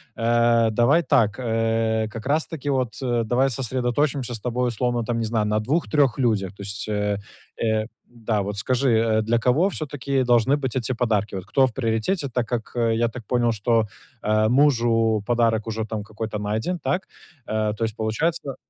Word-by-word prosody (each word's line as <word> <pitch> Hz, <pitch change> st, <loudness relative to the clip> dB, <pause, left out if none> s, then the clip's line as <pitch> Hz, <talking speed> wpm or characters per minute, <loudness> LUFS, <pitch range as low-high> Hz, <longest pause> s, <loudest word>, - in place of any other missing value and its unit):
Э, 115 Hz, 0 st, +3 dB
давай 135 Hz, +10 st, +3 dB
так, 105 Hz, -5 st, +3 dB
э, 115 Hz, -1 st, 0 dB
как 115 Hz, +1 st, -8 dB
раз-таки 150 Hz, 0 st, -1 dB
вот, 130 Hz, -4 st, 0 dB
э, 120 Hz, -2 st, +1 dB
давай 130 Hz, +4 st, +2 dB
сосредоточимся 130 Hz, +1 st, -1 dB
с 115 Hz, -, -4 dB
тобой 125 Hz, +1 st, -1 dB
условно 120 Hz, 0 st, -1 dB
там, 115 Hz, 0 st, -1 dB
не 115 Hz, -, -1 dB
знаю, 110 Hz, -1 st, 0 dB
на 105 Hz, 0 st, +1 dB
2-3 140 Hz, +1 st, +1 dB
людях. 105 Hz, -7 st, 0 dB
То 100 Hz, -, -11 dB
есть, 100 Hz, +1 st, -6 dB
э 105 Hz, -1 st, -1 dB, 0.4 s
э 110 Hz, -1 st, +1 dB, 0.2 s
Да, 115 Hz, -3 st, -2 dB
вот 100 Hz, +1 st, -4 dB
скажи, 115 Hz, -2 st, +2 dB
для 115 Hz, +2 st, +1 dB
кого 135 Hz, +11 st, +2 dB
всё-таки 140 Hz, -5 st, -2 dB
должны 120 Hz, +3 st, +3 dB
быть 135 Hz, -4 st, -3 dB
эти 130 Hz, 0 st, -1 dB
подарки, 110 Hz, -4 st, 0 dB
вот 95 Hz, -2 st, -5 dB
кто 135 Hz, +6 st, +3 dB
в 120 Hz, -, -8 dB
приоритете? 125 Hz, -, -1 dB
Так 125 Hz, -2 st, -2 dB
как 120 Hz, -2 st, -3 dB
я 115 Hz, -1 st, +2 dB
так 115 Hz, +1 st, -8 dB
понял, 120 Hz, -2 st, +2 dB
что, 115 Hz, +1 st, +1 dB, 0.4 s
а, 110 Hz, +1 st, +2 dB
мужу 115 Hz, -5 st, +3 dB
подарок 115 Hz, -2 st, +1 dB
уже 110 Hz, 0 st, -2 dB
там 110 Hz, -2 st, -4 dB
какой-то 110 Hz, 0 st, -5 dB
найден, 110 Hz, -, -2 dB
так. 185 Hz, +3 st, -1 dB, 0.4 s
Э, 110 Hz, 0 st, 0 dB
то 115 Hz, -, -2 dB
есть 110 Hz, -1 st, -4 dB
получается 135 Hz, +6 st, -1 dB
115 Hz, 175 wpm, -23 LUFS, 110-130 Hz, 0.4 s, Э